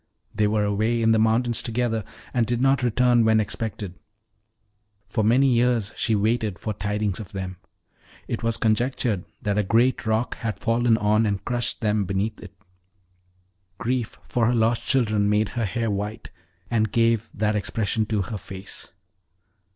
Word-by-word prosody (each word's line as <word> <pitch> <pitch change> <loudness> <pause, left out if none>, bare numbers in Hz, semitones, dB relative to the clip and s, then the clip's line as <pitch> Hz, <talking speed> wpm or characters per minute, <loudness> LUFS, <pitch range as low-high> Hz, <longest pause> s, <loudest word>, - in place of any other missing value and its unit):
They 105 0 +2
were 105 0 +1
away 110 +3 +1
in 115 - +4
the 110 - +4
mountains 115 +2 +2
together, 115 -2 -1 0.3
and 120 -3 +1
did 120 -1 0
not 135 0 +3
return 120 0 +3
when 110 0 +4
expected: 105 -3 -3 1.1
for 110 - -1
many 120 +6 +4
years 120 -3 +1
she 110 - +1
waited 110 -1 0
for 110 - -4
tidings 105 0 -2
of 105 0 -9
them. 95 -1 -5 0.7
It - - -3
was 115 -1 0
conjectured 115 -3 0 0.2
that 105 0 +1
a - - +2
great 115 +6 +2
rock 110 +2 0
had 115 -3 -3
fallen 115 -1 +2
on 105 +1 +2
and 100 -2 -2
crushed 120 0 -1
them 105 -2 +1
beneath 100 +4 -2
it. 100 -2 -12 1.2
Grief 120 0 -2
for 115 -2 0
her 120 - +2
lost 115 +1 +2
children 110 -6 +2
made 105 0 +2
her 120 -2 -2
hair 115 +2 -1
white, 105 +2 -4 0.4
and 110 -2 +1
gave 115 -1 +2
that 105 +1 +1
expression 110 +1 -1
to 105 -3 0
her 105 +1 -5
face." 95 +1 -9
110 Hz, 160 wpm, -24 LUFS, 105-120 Hz, 1.2 s, in